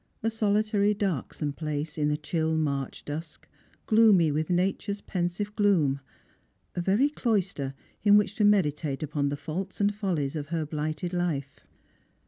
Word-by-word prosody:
A 225 - +1
solitary 210 -1 +2
dark 195 -9 -1
some 145 -2 -3
place, 150 0 -3
in 150 -2 +1
the 150 - +1
chill 160 0 -1
March 140 -4 -2
dusk, 155 +2 -7 0.4
gloomy 215 -8 +5
with 155 +2 -1
Nature's 195 +3 0
pen 175 -4 -1
sive 205 +4 -5
gloom 170 -10 +3 0.4
— - - -40 0.3
a 175 - -1
very 200 +10 +3
cloister 200 - -1 0.3
in 205 -1 +6
which 210 - +2
to 215 - +2
meditate 155 -8 +2
upon 145 -1 -1
*he 145 - -2
faults 180 +6 -5
and 205 0 +2
follies 175 -9 -1
of 145 -2 -4
her 165 0 -2
blighted 155 +4 -3
life. 150 -6 -2
170 Hz, 160 wpm, -28 LUFS, 150-205 Hz, 0.4 s, in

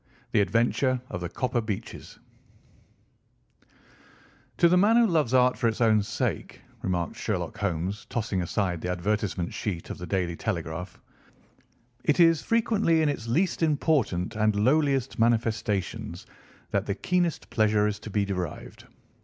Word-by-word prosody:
THE 105 - +3
ADVENTURE 120 +6 +1
OF 90 - -4
THE 90 - -3
COPPER 125 +3 -1
BEECHES 110 -3 -6 2.4
"To 170 - +6
the 175 - +4
man 205 +5 +5
who 235 0 +6
loves 160 - +1
art 125 0 +4
for 120 - +2
its 110 +1 -1
own 110 -3 +4
sake," 100 - -3 0.2
remarked 90 -2 -2
Sherlock - - -3
Holmes, 95 +2 -2
tossing 105 -5 -1
aside 90 -1 -1
the 90 - -3
advertisement 95 0 -1
sheet 90 -6 -4
of - - -7
The 90 - -6
Daily 90 -3 -1
Telegraph, 85 -2 -4 1.0
"it 150 - +1
is 165 -2 +5
frequently 220 -8 +2
in 150 - +2
its 115 -5 -4
least 170 +12 0
important 145 - +1
and 110 -1 +2
lowliest 135 +3 +1
manifestations 115 -4 0 0.5
that - - 0
the 100 - -1
keenest 175 +5 -1
pleasure 110 -2 +3
is 105 0 -1
to 110 - -9
be 105 0 0
derived. 90 -5 -5
110 Hz, 145 wpm, -27 LUFS, 95-140 Hz, 2.4 s, To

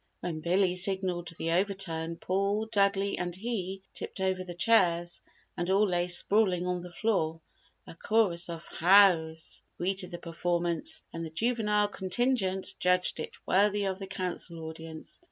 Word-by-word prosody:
When 165 -3 -3
Billy 180 +3 +2
signalled 185 -2 0
the 165 - -1
overturn, 170 -3 -1
Paul, 200 +4 0
Dudley 200 -2 +1
and 175 -1 -2
he, 195 -3 -4
tipped - - -6
over 190 -1 0
the 175 -1 -8
chairs 175 -4 +2 0.3
and 175 +1 -2
all 200 +2 +4
lay 175 -1 0
sprawling 180 0 +2
on 180 -1 -1
the 180 - -8
floor. 170 -4 0 0.5
A - - -10
chorus 180 -2 +1
of 170 -1 -6
"Hows" 165 -3 +4 0.2
greeted 185 0 -1
the 175 - -6
performance 175 - -2
and 165 - -4
the 165 - -5
juvenile 210 +2 +1
contingent 190 -1 -1
judged 180 0 +2
it - - -5
worthy 205 +1 +3
of 190 -1 -2
the 195 - -6
Council 180 -3 -4
audience. 160 0 -8
185 Hz, 150 wpm, -29 LUFS, 170-200 Hz, 0.5 s, all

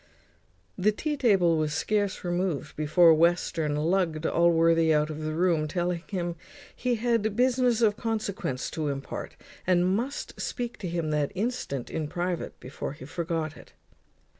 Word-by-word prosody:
The 210 +3 +4
tea 300 +8 -2
table 195 - +3
was 155 -1 -1
scarce 205 +2 0
removed 175 -3 -2
before 160 +2 +5
Western 165 -2 +2
lugged 165 0 0
Allworthy 165 -1 +4
out 150 0 +2
of 155 0 -6
the 155 0 -3
room, 165 -3 +2
telling 175 +1 -1
him 175 -3 -3 0.4
he 250 -1 0
had 225 -2 0
business 250 -1 +3
of 210 -2 +3
consequence 200 - -2
to 155 -2 -2
impart, 140 -1 -5 0.3
and 180 -1 +4
must 230 +10 -2
speak 245 -2 -4
to 185 - -4
him 165 -2 -2
that 150 -2 0
instant 195 - -3
in 160 -2 -2
private, 175 +2 -3
before 130 +1 -6
he 130 - -11
forgot 160 0 -3
it. - - -15
175 Hz, 150 wpm, -27 LUFS, 155-205 Hz, 0.4 s, before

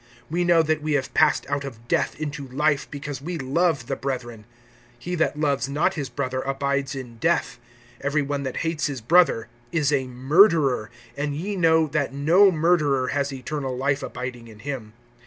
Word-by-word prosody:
(14)We 175 +1 +2
know 170 -2 +5
that 155 0 0
we 155 0 -1
have 135 -3 -1
passed 155 -1 +3
out 140 0 -1
of 120 -4 -9
death - - 0
into 145 -2 -4
life, 145 +2 0
because 145 -2 -6
we 170 +4 -4
love 145 0 0
the 135 - -2
brethren. 120 -6 -5 0.5
He 175 +8 -6
that 160 -3 0
loves 140 -2 0
not 155 +7 +1
his 145 -6 -4
brother[3:14] 130 +1 -3
abides 140 0 -1
in 125 -3 -8
death. - - 0 0.4
(15)Every 145 +1 +1
one 140 0 -2
that 130 -2 -4
hates 160 -3 0
his 140 -3 -4
brother 140 -2 +3 0.2
is 150 -3 +1
a 135 -2 +1
murderer[3:15]; 135 - +3 0.3
and 145 0 -2
ye 195 +7 -3
know 160 -3 +4
that 145 -2 -2
no 175 +8 +5
murderer 155 -6 +2
has 140 0 -1
eternal 135 -1 -4
life 140 +1 0
abiding 125 -2 -6
in 110 -2 -13
him. 125 -5 -6
140 Hz, 180 wpm, -24 LUFS, 130-155 Hz, 0.5 s, know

